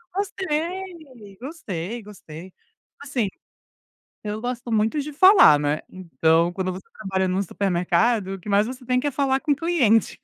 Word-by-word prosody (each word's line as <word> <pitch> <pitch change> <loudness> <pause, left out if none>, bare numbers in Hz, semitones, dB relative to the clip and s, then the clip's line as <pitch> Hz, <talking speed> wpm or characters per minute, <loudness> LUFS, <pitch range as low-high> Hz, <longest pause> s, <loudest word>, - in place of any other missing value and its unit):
Gostei. 335 - -4
Gostei, 230 - -6
gostei. 185 -3 -12 0.5
Assim, 260 -6 -1 1.0
eu 210 +1 -4
gosto 245 -1 -4
muito 220 +6 +1
de 295 +1 -6
falar, 370 - +7
né, 145 +1 -1
então 170 -2 +1
quando 185 0 -3
você 185 +1 -8
trabalha 190 -3 -2
num 185 +2 0
supermercado, 190 +2 0
o 190 - -9
que 210 - -12
mais 205 +1 +3
você 255 +1 -8
tem 250 +1 +1
que 290 - -3
é - - +1
falar 270 0 +1
com 310 -2 0
o 280 - +1
cliente. 285 -10 +2
220 Hz, 160 wpm, -23 LUFS, 185-285 Hz, 1.0 s, falar